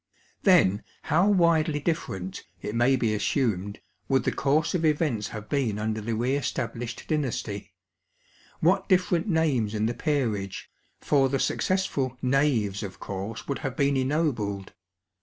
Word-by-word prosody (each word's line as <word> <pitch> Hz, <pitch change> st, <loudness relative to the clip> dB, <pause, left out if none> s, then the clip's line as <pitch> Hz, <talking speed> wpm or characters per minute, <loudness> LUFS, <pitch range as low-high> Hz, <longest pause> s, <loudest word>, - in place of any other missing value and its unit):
Then 130 Hz, -, +5 dB, 0.2 s
how 175 Hz, +7 st, +3 dB
widely 170 Hz, -5 st, +3 dB
different, 135 Hz, -, -3 dB, 0.2 s
it 105 Hz, -, -5 dB
may 120 Hz, +3 st, +3 dB
be 115 Hz, -4 st, +1 dB
assumed, 105 Hz, -3 st, -1 dB, 0.3 s
would 135 Hz, -2 st, +3 dB
the -, -, +1 dB
course 150 Hz, +3 st, +1 dB
of 175 Hz, -3 st, 0 dB
events 150 Hz, -8 st, +1 dB
have 110 Hz, -1 st, -8 dB
been 125 Hz, -8 st, 0 dB
under 110 Hz, +1 st, -2 dB
the 115 Hz, +2 st, -2 dB
re 125 Hz, +5 st, +1 dB
established 120 Hz, -3 st, -3 dB
dynasty 125 Hz, -9 st, -3 dB, 0.4 s
— -, -, -31 dB
what 190 Hz, +5 st, +2 dB
different 180 Hz, 0 st, +2 dB
names 145 Hz, -, +1 dB
in 105 Hz, 0 st, 0 dB
the 115 Hz, -, 0 dB
peerage; 115 Hz, -, -2 dB, 0.3 s
for 135 Hz, -2 st, +3 dB
the 135 Hz, -, +1 dB
successful 140 Hz, -6 st, 0 dB
" -, -, -34 dB
knaves" 120 Hz, -9 st, +2 dB
of 100 Hz, -2 st, -7 dB
course 100 Hz, +3 st, -6 dB
would 140 Hz, -, -2 dB
have 135 Hz, -4 st, -4 dB
been 140 Hz, -1 st, +2 dB
ennobled. 130 Hz, -, -1 dB
130 Hz, 150 wpm, -27 LUFS, 110-155 Hz, 0.4 s, Then